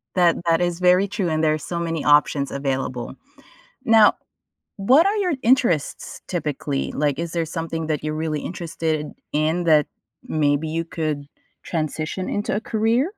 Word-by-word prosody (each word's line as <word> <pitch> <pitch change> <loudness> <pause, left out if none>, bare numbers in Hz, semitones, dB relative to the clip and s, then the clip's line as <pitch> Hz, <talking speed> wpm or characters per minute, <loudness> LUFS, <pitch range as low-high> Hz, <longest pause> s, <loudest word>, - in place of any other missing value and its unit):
That 175 -2 +4
that 165 0 +3
is 175 -1 -1
very 180 +2 +4
true 200 -3 -2
and 155 0 0
there's 155 -1 +1
so 170 - -3
many 165 -2 -2
options 145 -1 +3
available. 135 -3 -3 0.7
Now, 225 -3 +6 0.6
what 260 - +5
are 410 - +1
your 365 -6 +1
interests 235 - +1
typically? 145 -4 -2
Like, 145 -1 0
is 170 -1 -3
there 170 -1 0
something 165 0 -4
that 155 -2 -2
you're 155 0 -2
really 155 -1 -2
interested 160 -3 -3 0.3
in 160 +4 +1
that 155 -3 +4 0.4
maybe 150 0 0
you 165 +1 -2
could 155 -3 -3 0.4
transition 155 +2 -3
into 205 - -1
a 210 - -1
career? 230 - 0
165 Hz, 155 wpm, -22 LUFS, 150-185 Hz, 0.7 s, Now